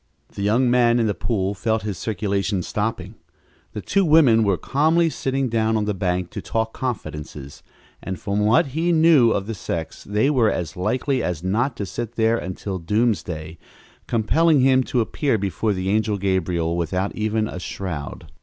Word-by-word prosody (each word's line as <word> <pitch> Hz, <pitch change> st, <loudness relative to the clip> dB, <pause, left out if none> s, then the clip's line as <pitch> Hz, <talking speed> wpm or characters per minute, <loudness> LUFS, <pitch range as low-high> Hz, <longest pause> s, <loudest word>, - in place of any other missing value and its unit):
The -, -, -6 dB
young 115 Hz, +6 st, +2 dB
man 120 Hz, -1 st, +3 dB
in 115 Hz, -, +2 dB
the 105 Hz, -, +1 dB
pool 100 Hz, 0 st, -1 dB
felt 110 Hz, +2 st, -1 dB
his 105 Hz, -2 st, -3 dB
circulation 100 Hz, -1 st, -2 dB
stopping. 110 Hz, +5 st, -3 dB, 0.6 s
The 105 Hz, -, -6 dB
two 200 Hz, -, +2 dB
women 150 Hz, -9 st, +5 dB
were 100 Hz, -3 st, +2 dB
calmly 160 Hz, -, +2 dB
sitting 135 Hz, -1 st, -1 dB
down 110 Hz, -1 st, +1 dB
on 105 Hz, -, 0 dB
the 105 Hz, -, -1 dB
bank 90 Hz, -1 st, -2 dB
to -, -, -5 dB
talk 110 Hz, 0 st, -2 dB
confidences, 75 Hz, -, -6 dB, 0.4 s
and 95 Hz, -2 st, -5 dB
from 100 Hz, 0 st, -2 dB
what 110 Hz, +6 st, +3 dB
he 165 Hz, +3 st, +1 dB
knew 160 Hz, -7 st, +5 dB
of 100 Hz, -3 st, 0 dB
the 115 Hz, -, -4 dB
sex 85 Hz, -4 st, -5 dB
they 105 Hz, +8 st, +1 dB
were 120 Hz, -6 st, +3 dB
as 80 Hz, -5 st, -3 dB
likely 130 Hz, +8 st, 0 dB
as 85 Hz, -2 st, -3 dB
not 115 Hz, +8 st, 0 dB
to 100 Hz, -, -3 dB
sit 120 Hz, +4 st, -6 dB
there 115 Hz, +1 st, +2 dB
until 95 Hz, +1 st, -5 dB
doomsday, 85 Hz, -5 st, -1 dB, 0.5 s
compelling 145 Hz, +7 st, +3 dB
him 130 Hz, 0 st, +4 dB
to 125 Hz, -, 0 dB
appear 125 Hz, +2 st, 0 dB
before 100 Hz, +2 st, -1 dB
the 95 Hz, -1 st, -2 dB
angel 105 Hz, 0 st, +1 dB
Gabriel 90 Hz, -3 st, 0 dB
without 90 Hz, +3 st, -2 dB
even 110 Hz, 0 st, 0 dB
a 90 Hz, -, -6 dB
shroud. 90 Hz, -5 st, -6 dB
105 Hz, 175 wpm, -22 LUFS, 95-120 Hz, 0.6 s, women